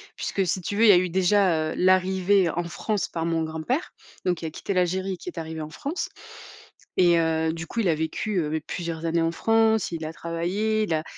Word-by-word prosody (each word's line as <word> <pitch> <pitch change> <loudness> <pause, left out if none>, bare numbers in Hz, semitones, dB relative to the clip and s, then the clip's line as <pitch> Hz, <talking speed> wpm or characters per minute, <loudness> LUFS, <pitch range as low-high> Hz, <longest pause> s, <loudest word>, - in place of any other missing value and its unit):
puisque 195 - -1
si 185 +2 -1
tu 200 - -4
veux, 225 - +4
il 225 - +7
y - - +11
a 180 - +7
eu 180 0 +1
déjà, 180 -3 +2
heu, - - -5
l'arrivée 185 0 +3
en 175 +2 -2
France 205 +4 -2
par 165 -1 -3
mon 165 -1 0
grand 160 0 -5
père 265 - -2 0.3
donc 180 -2 +1
qui 165 - -7
a 160 - -4
quitté 195 +5 -4
l'Algérie, 185 +1 0
qui 175 - -7
est 175 - -7
arrivé 160 0 -5
en 155 - -6
France. 300 - -4 0.9
Et 175 -2 +5
heu, 160 0 +1
du 165 0 -6
coup 235 - -4
il 205 - +1
a 160 - +3
vécu, 170 +6 -2
heu 155 -3 -1
mais 160 0 -1
plusieurs 165 -1 -5
années 165 0 +1
en 165 - +1
France, 220 +2 +2
il 165 -2 -4
a 155 - -5
travaillé, 185 +7 -1
il 195 - -1
a 155 0 0
175 Hz, 240 wpm, -25 LUFS, 160-195 Hz, 0.9 s, y